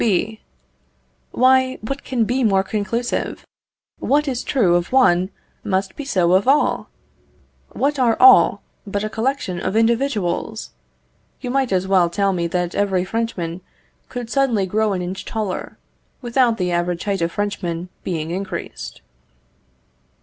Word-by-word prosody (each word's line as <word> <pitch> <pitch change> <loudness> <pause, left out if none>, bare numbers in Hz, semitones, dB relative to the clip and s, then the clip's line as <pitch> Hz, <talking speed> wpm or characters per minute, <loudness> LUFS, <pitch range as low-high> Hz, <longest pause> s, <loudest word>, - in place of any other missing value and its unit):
B. 220 +1 0 0.9
Why, 260 0 +3
what 275 +5 -4
can 245 -3 0
be 250 +4 0
more 195 -4 +3
conclusive? 215 +4 -2 0.5
What 295 +2 +1
is 255 -3 -2
true 205 -10 +2
of 175 0 -1
one, 185 -9 +4 0.3
must 190 -2 -1
be 290 - -6
so 180 -10 +2
of 190 +5 +3
all! 285 +3 +2 0.8
What 285 +1 0
are 235 -3 +3
all, 390 - +7 0.2
but 200 +1 -2
a 215 - -3
collection 225 -6 -2
of 185 +3 -2
individuals? 225 -5 0 0.7
You 245 - -4
might 270 -3 +1
as 185 0 +1
well 185 -3 +4
tell 195 +2 +1
me 170 -2 -1
that 175 0 -2
every 190 -3 +1
Frenchman 185 -6 -3 0.5
could 245 -2 -6
suddenly 250 -8 +2
grow 210 +2 0
an 180 -1 -2
inch 185 +2 -5
taller, 215 -4 -4 0.5
without 240 -1 +2
the 180 -1 -1
average 175 0 -1
height 200 -3 -1
of 170 0 0
Frenchmen 180 -4 -3
being 160 -2 -3
increased. 185 -1 -6
205 Hz, 140 wpm, -20 LUFS, 180-245 Hz, 0.9 s, all